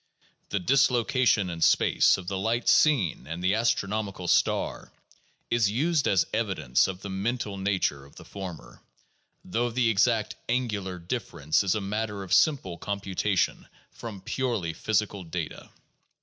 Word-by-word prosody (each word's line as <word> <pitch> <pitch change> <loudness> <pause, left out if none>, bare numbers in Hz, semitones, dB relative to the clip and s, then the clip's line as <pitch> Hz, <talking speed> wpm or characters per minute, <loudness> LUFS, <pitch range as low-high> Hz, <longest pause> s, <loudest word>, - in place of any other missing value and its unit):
The 100 - -1
dislocation 125 -2 +2
in 85 -1 -7
space - - +4
of 95 -2 -9
the 95 0 -2
light 115 +4 -1
seen 130 - +3
and 80 +3 -5
the 95 +2 +3
astronomical 105 -4 -1
star - - +1 0.6
is 115 -3 +3
used 150 +7 +1
as 95 -2 +3
evidence 85 - +1
of 95 0 -6
the 100 - -5
mental 105 +2 -2
nature 95 -8 -1
of 70 - -18
the - - -12
former, 95 -4 -9 0.6
though 120 +6 -1
the 120 -1 +2
exact 115 +1 +1
angular 105 -7 -1
difference 85 - -1
is 95 +1 +1
a 110 - -1
matter 105 0 -3
of 90 - -3
simple 95 - +2
computation 100 -1 -1 0.2
from 105 -5 -8
purely 110 -6 -2
physical 105 0 -1
data. 80 -3 -6
100 Hz, 140 wpm, -27 LUFS, 95-115 Hz, 0.6 s, space